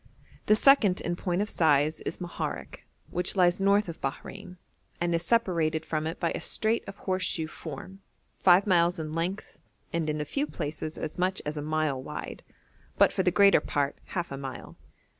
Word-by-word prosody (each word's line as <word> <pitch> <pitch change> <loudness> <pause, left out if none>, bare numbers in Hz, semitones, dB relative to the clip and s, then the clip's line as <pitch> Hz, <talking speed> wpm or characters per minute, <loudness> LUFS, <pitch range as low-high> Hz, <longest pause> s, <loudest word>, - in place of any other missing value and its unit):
The 215 - +6
second 215 -7 +5
in 175 - -2
point 180 +2 -1
of 210 - -6
size 155 -1 +3
is - - -5
Moharek, 175 -2 -5 0.2
which 180 +3 -2
lies 180 -1 +4
north 200 +1 +3
of 170 - -7
Bahrein, 135 +6 -6 0.4
and 175 0 0
is 165 - +1
separated 170 -8 +1
from 155 0 -2
it 165 - -5
by 170 - 0
a - - -4
strait 220 +1 0
of 195 +1 -8
horse 185 -1 -2
shoe 160 -3 0
form, 170 +5 -9 0.4
five 185 +1 +6
miles 175 -2 +3
in 155 -1 -5
length, 175 +5 -3 0.3
and 165 -2 0
in 150 0 -1
a 150 - -2
few 280 - -1
places 155 - -5
as 155 +2 -5
much 185 +1 +1
as 150 +1 -3
a 150 - -3
mile 155 -3 -1
wide, - - -7 0.6
but - - +5
for - - +1
the 180 - +3
greater 200 -2 +5
part 145 -1 -1
half 175 -4 -4
a 135 - -4
mile. 135 -1 -7
170 Hz, 190 wpm, -28 LUFS, 155-190 Hz, 0.6 s, The